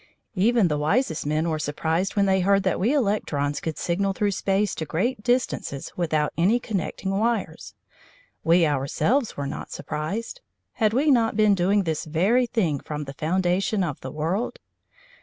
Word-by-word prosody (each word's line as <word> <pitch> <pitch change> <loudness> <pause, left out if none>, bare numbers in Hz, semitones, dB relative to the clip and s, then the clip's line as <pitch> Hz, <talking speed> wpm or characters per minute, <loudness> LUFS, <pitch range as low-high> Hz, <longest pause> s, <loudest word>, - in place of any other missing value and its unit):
Even 220 +1 +3
the 150 -2 -1
wisest 160 - 0
men 155 +2 0
were 160 -2 -1
surprised 160 +6 -1
when 200 -1 +3
they 190 -1 +3
heard 195 +1 +3
that 190 - 0
we 220 +7 +2
electrons 200 - 0
could 160 -2 -4
signal 195 +3 0
through 205 +1 0
space 195 0 0
to - - -4
great 210 +10 -1
distances 240 - -1
without 155 -4 0
any 195 +8 +3
connecting 195 -3 -3
wires. 205 -5 -2 0.7
We 170 +1 +4
ourselves 155 - 0
were 140 - -3
not 140 - -6
surprised. 215 - -4 0.3
Had 215 -3 +1
we 285 +5 +3
not 225 -4 +2
been 215 -1 +5
doing 195 +2 +2
this 160 -3 -2
very 195 +11 +2
thing 175 - 0
from 150 +1 -5
the 135 -1 -8
foundation 185 +6 0
of 150 -6 -4
the 130 - -6
world? 165 - -2
190 Hz, 165 wpm, -24 LUFS, 155-215 Hz, 0.7 s, been